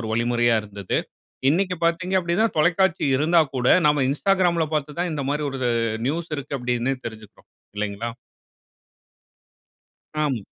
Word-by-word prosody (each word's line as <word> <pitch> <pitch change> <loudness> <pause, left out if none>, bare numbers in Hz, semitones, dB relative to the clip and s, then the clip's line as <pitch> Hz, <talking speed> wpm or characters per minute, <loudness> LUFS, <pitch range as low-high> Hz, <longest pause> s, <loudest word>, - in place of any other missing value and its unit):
ஒரு 110 - -5
வழிமுறையா 120 0 +2
இருந்தது. 100 -2 -3 0.5
இன்னிக்கு 180 +3 +1
பார்த்தீங்கப்படினா, 180 +3 +1
தொலைக்காட்சி 175 +3 +2
இருந்தா 165 +5 +4 0.2
கூட, 125 -1 -1 0.2
நாம 145 -2 +3
இன்ஸ்டாகிராம்ல 175 +1 +2
பார்த்து 150 +1 -3
தான் 175 0 0
இந்த 145 -3 -3
மாரி 150 +1 -1
ஒரு 135 - -5 0.5
நியூஸ் 165 +4 -2
இருக்கு 140 0 -4
அப்படினு 125 +1 -1
தெரிஞ்சுக்கறோம். 110 -2 -11 0.3
இல்லைங்களா? 105 +2 -3 2.2
ஆம். 135 -5 0
145 Hz, 120 wpm, -23 LUFS, 120-170 Hz, 2.2 s, இருந்தா